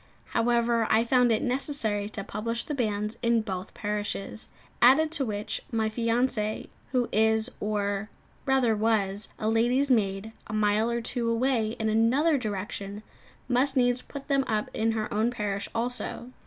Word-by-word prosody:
However, 235 -1 +2
I 220 +1 +4
found 245 0 +3
it 220 - +1
necessary 245 -6 -1
to 215 -2 -5
publish 230 +4 -3
the 300 - -4
banns 215 -4 -1
in 235 -1 +3
both 190 -2 -5
parishes; 210 0 -4 0.3
added 280 +6 +6
to 290 -4 0
which 210 -2 -3
my 220 -2 +1
fiancée, 230 -1 0 0.2
who 250 -2 +1
is, 220 +1 +2
or 205 0 -1 0.4
rather 260 -4 +3
was, 210 -2 +1
a 215 - -2
lady's 245 +5 +2
maid, 200 -2 +1 0.2
a 215 - -6
mile 215 +1 +2
or 235 0 -1
two 235 0 -2
away 230 -2 +1
in 220 - -1
another 255 +8 +3
direction, 205 -1 -5 0.4
must 260 +2 +1
needs 245 0 +3
put 280 -1 -9
them 275 -2 +2
up 215 -1 -1
in 225 +1 +1
her 215 -1 -1
own 220 +3 +2
parish 210 -4 -3
also. 245 +1 -3
225 Hz, 155 wpm, -27 LUFS, 210-245 Hz, 0.4 s, added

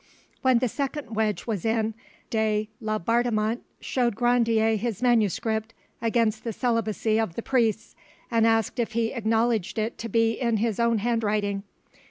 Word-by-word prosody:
When 260 -2 +4
the 250 +2 +1
second 275 -1 -4
wedge 215 -1 0
was 210 -7 -2
in, 225 -1 0 0.4
de 215 -1 +1
Laubardemont 220 +2 0 0.2
showed 240 -4 0
Grandier 230 -2 +3
his 220 -1 -2
manuscript 220 -2 +1 0.3
against 225 -2 +1
the 230 - -3
celibacy 225 -2 0
of 220 -7 -1
the 230 - -4
priests, 230 -4 0 0.4
and 230 -1 +4
asked 225 +1 +1
if 230 -2 -1
he 230 0 0
acknowledged 225 -3 0
it 220 +2 -2
to 230 - -5
be 225 +1 +3
in 235 -3 +2
his 220 0 -1
own 235 -1 +3
handwriting. 210 -3 0
225 Hz, 150 wpm, -26 LUFS, 215-235 Hz, 0.4 s, When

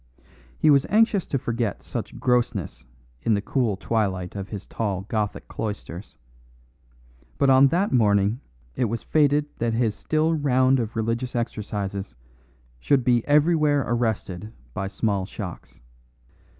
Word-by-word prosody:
He 155 - +4
was 140 -1 +4
anxious 215 -3 +3
to 135 - 0
forget 120 -3 -2
such - - -5
grossness 120 - 0 0.4
in 110 - +2
the - - +1
cool 110 -2 0
twilight 95 -5 -1
of 100 -1 -5
his 100 -2 -6
tall 100 -4 -2
Gothic 105 +1 -3
cloisters; 105 -3 -6 1.2
but 140 -1 +4
on 135 +1 +7
that 180 +8 +1
morning 105 -1 +3 0.4
it 125 - +1
was 115 +1 -3
fated 145 -1 +3
that 115 0 0
his 115 -2 +1
still 155 +8 0
round 130 -3 +3
of 115 -2 -3
religious 115 +3 -2
exercises 100 - -3 0.6
should 135 - +2
be 120 -1 +3
everywhere 150 -1 +3
arrested 110 -4 -2 0.2
by 95 +4 -3
small 100 -2 -1
shocks. 95 -5 -8
115 Hz, 135 wpm, -24 LUFS, 100-135 Hz, 1.2 s, on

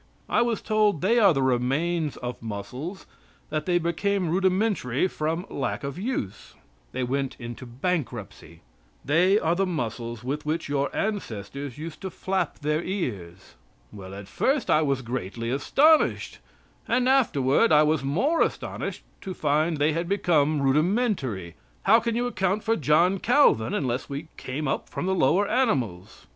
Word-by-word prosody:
I - - +2
was 235 -2 0
told: 210 -6 +2
"They 225 +6 +3
are 200 -4 +6
the 135 -4 +1
remains 140 +6 0
of 125 -1 -6
muscles; 120 - -6 0.5
that 155 0 -2
they 175 -1 +3
became 175 +1 0
rudimentary 185 - +1
from 165 +1 -2
the - - -13
lack 140 - -2
of 140 +4 -5
use." 195 - -4 0.4
They 130 - -2
went 135 +2 -2
into 120 +1 -8
bankruptcy. 120 - -4 0.4
They 180 +7 +4
are 165 -5 +1
the 195 +2 0
muscles 120 -7 -4
with 140 +4 -3
which 160 +2 -2
your 140 -1 0
ancestors 140 - -4
used 155 +1 -8
to 190 - -4
flap 185 -2 -2
their 150 +2 0
ears. 100 - -5 0.4
Well, 95 -1 -9
at 100 0 -9
first, 270 0 0
I 155 - +5
was 135 -3 0
greatly 115 -1 -4
astonished, 295 - +3 0.5
and 250 +2 +2
afterward 230 - +3
I 150 0 +6
was 155 -2 +1
more 210 - +1
astonished - - -2 0.2
to 190 -1 -6
find 155 +2 +1
they 150 +2 +2
had 170 +2 -2
become 155 -7 +2
rudimentary. 145 - 0 0.3
How 225 - +6
can 230 0 -2
you 240 +1 0
account 195 -3 -1
for 225 - +2
John 170 - +3
Calvin 235 - +3
unless 130 -1 -2
we 145 +3 -6
came 140 +4 -4
up 135 - -2
from - - -4
the 190 - +1
lower 185 +4 +3
animals? 120 - -1
155 Hz, 155 wpm, -26 LUFS, 130-190 Hz, 0.5 s, are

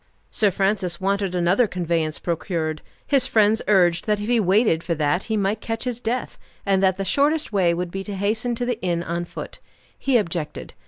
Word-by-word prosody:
Sir 210 -3 +2
Francis 195 -2 0
wanted 195 -1 0
another 180 +7 +3
conveyance 165 -4 -1
procured; 160 -2 -2 0.2
his 275 -3 +2
friends 215 0 +3
urged 180 -4 +3
that 210 -1 +1
if 205 - -4
he 240 -1 +3
waited 195 -3 +3
for 170 0 -2
that 155 +4 0
he 220 -1 -1
might 205 +2 0
catch 225 0 -3
his 250 -2 -3
death, 245 +1 -3 0.3
and 195 -1 +2
that 190 -1 +3
the 195 - -3
shortest 290 - +1
way 185 -4 +3
would 175 0 -3
be 195 +1 -4
to 205 - -5
hasten 220 +5 -1
to 245 - -2
the 245 -2 -2
inn 170 -2 -1
on 170 0 -3
foot. - - -8 0.4
He 270 -3 +3
objected. 170 -7 -4
195 Hz, 200 wpm, -23 LUFS, 175-220 Hz, 0.4 s, another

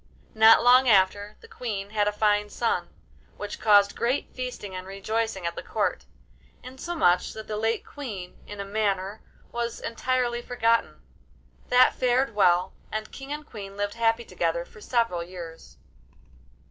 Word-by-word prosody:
Not 220 +1 +7
long 250 +1 +6
after, 205 +1 +3
the 455 - -14
Queen 210 - -5
had 210 -1 +1
a - - +2
fine 210 0 +1
son, 230 +2 -1 0.5
which 205 0 -6
caused 205 -2 +5
great 245 +4 -1
feasting 250 -6 -6
and 185 0 -6
rejoicing 195 0 -2
at 170 - -1
the - - -5
Court, - - -2 0.6
insomuch 255 - 0
that 220 0 -8
the 215 - -4
late 225 +2 -1
Queen, 210 -11 -7
in 205 0 -8
a 200 - -3
manner, 200 0 -1 0.3
was 235 0 -3
entirely 240 0 -1
forgotten. 230 -1 0 0.7
That 250 +1 +6
fared 250 -1 +1
well, 180 -2 +3 0.2
and 215 0 -4
King 270 +1 -9
and 300 0 -5
Queen 200 -6 -9
lived 205 0 -2
happy 230 0 +1
together 170 -2 -1
for 215 - -16
several 230 -9 0
years. 170 -2 -10
215 Hz, 150 wpm, -26 LUFS, 195-240 Hz, 0.7 s, Not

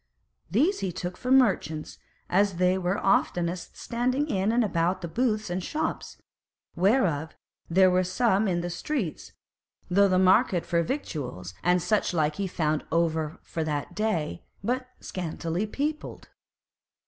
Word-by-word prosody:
These 375 +7 +2
he 190 - -2
took 180 +1 -5
for 250 - -5
merchants, 195 - +2 0.3
as 200 +2 +2
they 180 +1 +3
were 185 +1 0
oftenest 175 -3 0
standing 255 +5 -1
in 200 -5 +1
and 240 +1 +3
about 185 -2 0
the 170 - -4
booths 215 0 0
and 180 +1 -2
shops, 310 - -3 0.6
whereof 175 - +2 0.3
there 185 +2 +5
were 185 +1 +3
some 200 +2 +2
in 180 - +1
all - - -1
the 175 - -3
streets, 195 - -3 0.6
though 200 +2 +5
the 185 -1 +2
market 185 -1 +4
for 170 0 +1
victuals 140 - -4
and 180 0 +2
such 210 -4 +1
like 155 0 +1
he 200 -1 -1
found 155 -4 -1
over 160 -1 0
for 165 - -3
that 150 -2 -3
day, 210 -8 0 0.4
and - - -8
but 255 +2 -1
scantily 175 +2 -3
peopled. 300 +7 -4
185 Hz, 150 wpm, -27 LUFS, 170-215 Hz, 0.6 s, there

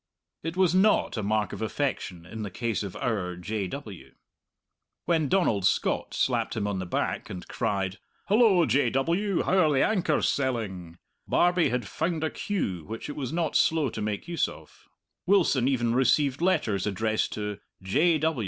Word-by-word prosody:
It 165 +2 -5
was 185 -2 +3
not 195 +4 +3
a 110 - -2
mark 105 -1 0
of - - -6
affection 110 -8 -3
in 110 +5 -7
the 105 - -4
case 115 +3 -2
of 100 -3 -6
our 95 -7 -2
"J. 100 +3 -3
W." 105 -5 -9 0.9
When 160 -4 +1
Donald 145 - +2
Scott 95 - 0
slapped - - 0
him 105 - -1
on 100 -2 -2
the 95 - -4
back - - -2
and 90 - -7
cried, 95 -1 -2 0.3
"Hullo, 205 -5 +5
J. 140 -5 +2
W., 170 - 0
how 190 - +2
are 160 -4 +4
the 135 - +3
anchors 180 -8 +1
selling?" 100 -11 -2 0.3
Barbie 175 -1 +3
had 125 0 -1
found 165 -2 -2
a 160 - 0
cue 95 - -3
which 110 - -7
it 145 - -5
was 135 -3 -4
not 165 -2 -1
slow 160 -4 +3
to - - -5
make 105 +6 -3
use 170 -3 0
of. - - -14 0.4
Wilson 170 -10 +3
even 120 -4 +1
received 135 +3 +2
letters 110 - +1
addressed 110 +2 0
to 105 -1 -4 0.2
"J. 155 - +3
125 Hz, 170 wpm, -27 LUFS, 105-165 Hz, 0.9 s, Hullo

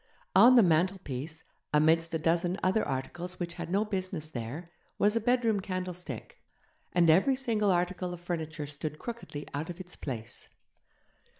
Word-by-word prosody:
On 250 +2 +8
the 235 - +8
mantelpiece, 165 -3 0 0.3
amidst 160 +2 +4
a - - +3
dozen 170 +3 +1
other 190 +4 +3
articles 175 +7 -4
which 170 -1 -3
had 170 -1 -6
no 200 +4 +2
business 185 -6 -3
there, 140 +8 -6 0.3
was 210 +2 +3
a 230 - +2
bedroom 230 -2 +2
candlestick; 185 -1 -5 0.5
and 175 -1 +4
every 190 - +5
single 225 -6 +1
article 180 0 0
of 175 - -6
furniture 160 -3 -4
stood 145 +1 -5
crookedly 230 -9 -7
out 145 +4 -3
of 175 +1 -7
its 180 -1 -8
place. 120 -4 -6
175 Hz, 155 wpm, -30 LUFS, 155-190 Hz, 0.5 s, On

